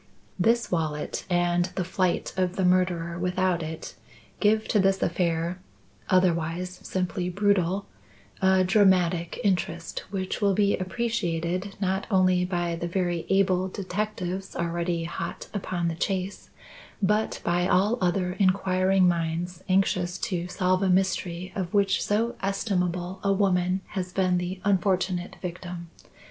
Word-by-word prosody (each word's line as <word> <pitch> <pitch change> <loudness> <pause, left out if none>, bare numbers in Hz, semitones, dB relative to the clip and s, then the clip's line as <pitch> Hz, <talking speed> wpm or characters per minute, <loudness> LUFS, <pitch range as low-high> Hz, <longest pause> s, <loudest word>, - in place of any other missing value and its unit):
"This 230 +5 +2
wallet, 155 -4 -2
and 175 0 +2
the 185 - 0
flight 185 0 -1
of 185 -1 0
the 190 - +1
murderer 180 -2 +1
without 180 -1 +1
it, 160 0 -6 0.5
give 215 +1 +3
to 210 - +3
this 195 0 +3
affair, 170 +1 0 0.5
otherwise 180 0 +1
simply 180 -1 -2
brutal, 200 0 +1 0.6
a 190 0 +4
dramatic 185 -3 +3
interest 170 -4 -1
which 190 0 -3
will 200 -2 +3
be 200 0 +3
appreciated 185 -2 -2
not 190 0 -1
only 185 -2 +3
by 175 -2 -1
the 170 +1 -3
very 175 -1 -1
able 190 -1 +3
detectives 190 -1 -4
already 170 0 -1
hot 165 - -5
upon 185 -4 -2
the 165 - 0
chase, 190 +3 -3 0.5
but 210 +3 +1
by 175 +1 +1
all 205 +7 +2
other 180 0 +1
inquiring 185 -1 +3
minds 170 +1 -1
anxious 185 -1 +2
to 180 -3 -2
solve 185 0 +1
a 195 - +2
mystery 185 -1 0
of 185 -1 -3
which 200 -1 +3
so 225 +3 +1
estimable 185 -2 -1
a 200 - +2
woman 190 -2 +2
has 185 -2 -4
been 185 -1 +2
the 180 +1 -4
unfortunate 185 -2 +1
victim. 175 -1 -6
185 Hz, 130 wpm, -26 LUFS, 175-195 Hz, 0.6 s, a